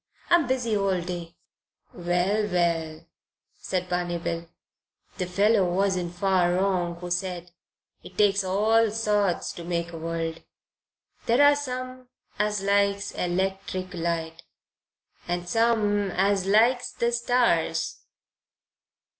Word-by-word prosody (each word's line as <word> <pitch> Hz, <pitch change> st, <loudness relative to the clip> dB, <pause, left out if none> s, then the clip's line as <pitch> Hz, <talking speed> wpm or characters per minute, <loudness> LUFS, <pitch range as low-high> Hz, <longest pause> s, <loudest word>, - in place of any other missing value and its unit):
"I'm 345 Hz, -5 st, +5 dB
busy 245 Hz, -4 st, 0 dB
all 195 Hz, -2 st, +1 dB
day 175 Hz, -1 st, -6 dB, 0.6 s
long." 175 Hz, -, -11 dB
"Well, 190 Hz, +5 st, +1 dB
well," 165 Hz, -4 st, -1 dB, 0.5 s
said 180 Hz, -1 st, -3 dB
Barney 175 Hz, -1 st, -1 dB
Bill, 170 Hz, 0 st, -4 dB, 0.7 s
"the 180 Hz, -, -1 dB
fellow 200 Hz, 0 st, +2 dB
wasn't 180 Hz, -2 st, 0 dB
far 180 Hz, -1 st, +2 dB
wrong 180 Hz, -2 st, 0 dB
who 175 Hz, +1 st, -8 dB
said 180 Hz, -1 st, -3 dB, 0.5 s
it -, -, -14 dB
takes 200 Hz, -1 st, +3 dB
all 215 Hz, +4 st, +3 dB
sorts 210 Hz, -4 st, 0 dB
to 170 Hz, -, -8 dB
make 170 Hz, 0 st, -3 dB
a 165 Hz, -, -6 dB
world. 165 Hz, 0 st, -3 dB, 0.9 s
There 240 Hz, +5 st, +4 dB
are 290 Hz, 0 st, +6 dB
some 255 Hz, -2 st, -6 dB, 0.3 s
as 210 Hz, -1 st, 0 dB
likes 200 Hz, 0 st, +1 dB
electric 185 Hz, +1 st, -2 dB
light 165 Hz, -1 st, -3 dB, 0.9 s
and 175 Hz, 0 st, -3 dB
some 210 Hz, -1 st, +2 dB
as 195 Hz, +1 st, +1 dB
likes 235 Hz, +5 st, +3 dB
the 235 Hz, 0 st, 0 dB
stars. 235 Hz, -10 st, +1 dB
190 Hz, 120 wpm, -26 LUFS, 175-210 Hz, 0.9 s, are